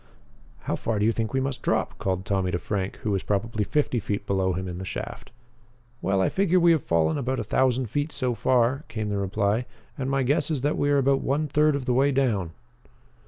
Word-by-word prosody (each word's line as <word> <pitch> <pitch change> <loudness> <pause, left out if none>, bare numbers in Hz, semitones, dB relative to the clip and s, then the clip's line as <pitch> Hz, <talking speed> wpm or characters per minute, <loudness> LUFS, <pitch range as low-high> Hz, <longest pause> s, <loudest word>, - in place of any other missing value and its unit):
"How - - -2
far 115 -2 -2
do 105 - +2
you 115 - +4
think 110 -1 -2
we 135 - +1
must 135 0 -2
drop?" - - -1
called 95 0 -2
Tommy 95 -2 0
to 90 - 0
Frank, 95 +2 -3
who 105 - 0
was 95 -2 0
probably 105 +2 -1
fifty 135 +1 0
feet 100 -1 -3
below 95 -2 +1
him 95 +1 -3
in 90 0 -5
the - - -5
shaft. 95 - -6 0.7
"Well, 95 +1 +1
I - - +3
figure 185 -2 +2
we 170 -1 +5
have 160 -3 +3
fallen 80 - +1
about 130 0 -1
a - - -1
thousand 130 -1 +1
feet 145 +8 -2
so 125 -3 -1
far," 125 +4 +2
came 110 -1 -3
the 100 -1 -1
reply, 100 +4 0 0.3
"and 135 0 -1
my 135 -1 +1
guess 140 +6 +1
is 150 -5 -1
that 145 +3 +1
we 145 - +1
are 145 - +4
about 135 0 +3
one 145 +3 0
third 150 +1 +3
of 140 -2 -3
the 125 - +1
way 135 +3 +3
down." 115 -10 +1
120 Hz, 230 wpm, -25 LUFS, 100-135 Hz, 0.7 s, we